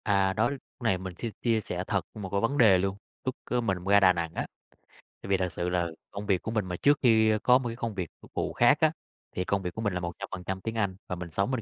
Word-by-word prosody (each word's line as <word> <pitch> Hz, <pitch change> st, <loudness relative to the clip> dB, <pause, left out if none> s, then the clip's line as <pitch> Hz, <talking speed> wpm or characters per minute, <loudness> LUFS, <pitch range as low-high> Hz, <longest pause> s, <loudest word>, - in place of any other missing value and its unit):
À, 100 Hz, -2 st, +2 dB
đó, 110 Hz, +5 st, +2 dB
lúc 140 Hz, -, -5 dB, 0.2 s
này 110 Hz, -5 st, +3 dB
mình 95 Hz, 0 st, -6 dB
xin 115 Hz, -, -2 dB
chia 115 Hz, -2 st, +2 dB
sẻ 90 Hz, -2 st, -4 dB
thật 100 Hz, -5 st, 0 dB
một 105 Hz, -4 st, -6 dB
cái 100 Hz, +1 st, 0 dB
vấn 125 Hz, +5 st, 0 dB
đề 110 Hz, -8 st, +7 dB
luôn, 95 Hz, +2 st, -1 dB, 0.3 s
lúc, 130 Hz, -, -1 dB
ơ, 125 Hz, -, 0 dB
mình 95 Hz, -5 st, 0 dB
ra 100 Hz, +1 st, +6 dB
Đà 95 Hz, -2 st, +6 dB
Nẵng 85 Hz, -1 st, -3 dB
á, -, -, -2 dB, 0.8 s
tại -, -, -8 dB
vì 95 Hz, -, +4 dB
thật 90 Hz, -1 st, -1 dB
sự 90 Hz, +1 st, -2 dB
là 90 Hz, -1 st, +1 dB, 0.2 s
công 100 Hz, +1 st, -6 dB
việc 95 Hz, -3 st, +2 dB
của 110 Hz, -, -4 dB
mình 110 Hz, -3 st, 0 dB
mà 90 Hz, -1 st, -4 dB
trước 145 Hz, +9 st, +3 dB
khi 110 Hz, -3 st, +5 dB
có 125 Hz, 0 st, +6 dB
một 130 Hz, -2 st, -3 dB
cái 115 Hz, -, -5 dB
công 115 Hz, -3 st, -4 dB
việc 90 Hz, -4 st, -3 dB
phục -, -, -16 dB
vụ -, -, -2 dB
khác 120 Hz, +5 st, +5 dB
á, 155 Hz, -1 st, +5 dB, 0.4 s
thì 90 Hz, -, 0 dB
công 100 Hz, +1 st, 0 dB
việc 90 Hz, -2 st, -4 dB
của 110 Hz, -, -5 dB
mình 105 Hz, -4 st, 0 dB
là 90 Hz, -, -1 dB
100% 95 Hz, +1 st, -5 dB
tiếng 110 Hz, +2 st, -4 dB
Anh 100 Hz, -4 st, 0 dB
và 90 Hz, -, -3 dB
mình 90 Hz, -1 st, -6 dB
sống 100 Hz, +6 st, +1 dB
bên 130 Hz, -3 st, -1 dB
100 Hz, 285 wpm, -28 LUFS, 90-115 Hz, 0.8 s, đề